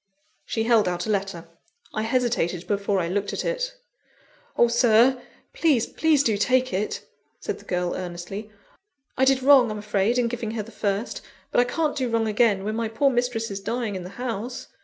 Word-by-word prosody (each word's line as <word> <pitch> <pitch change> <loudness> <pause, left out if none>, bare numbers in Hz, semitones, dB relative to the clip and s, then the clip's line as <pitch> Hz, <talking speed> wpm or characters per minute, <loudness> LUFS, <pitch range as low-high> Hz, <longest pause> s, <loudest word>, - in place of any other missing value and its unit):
She 225 - -1
held 225 -3 +4
out 175 -1 -2
a 220 - -1
letter. 195 -4 -2 0.5
I 215 - -1
hesitated 225 -7 0
before 200 -1 0
I 170 - -1
looked 200 +3 -2
at - - -3
it. - - -2 0.8
"Oh, 240 - +6
Sir! 240 +2 +4 0.3
please, 290 -9 +2
please 310 -3 +2
do 220 -6 +1
take 255 +3 +2
it!" 200 +3 -2 0.3
said - - -4
the - - -17
girl 180 -1 -1
earnestly. 185 +4 -6 0.7
"I 265 - +3
did 265 -1 +3
wrong, 265 -4 +7
I'm 215 - -4
afraid, 210 +2 0
in 245 -1 +2
giving 235 -2 -4
her 215 - -2
the 225 - -13
first; 200 +2 -2 0.3
but - - +2
I 245 - +5
can't 310 0 0
do 260 -4 -1
wrong 230 -1 +1
again, 210 -2 +2
when 215 +2 -2
my 230 0 -1
poor 250 +6 +2
mistress 245 -3 -1
is 195 - -4
dying 225 +1 -3
in 185 - -4
the 180 - -8
house. 245 0 -4
225 Hz, 195 wpm, -24 LUFS, 200-250 Hz, 0.8 s, wrong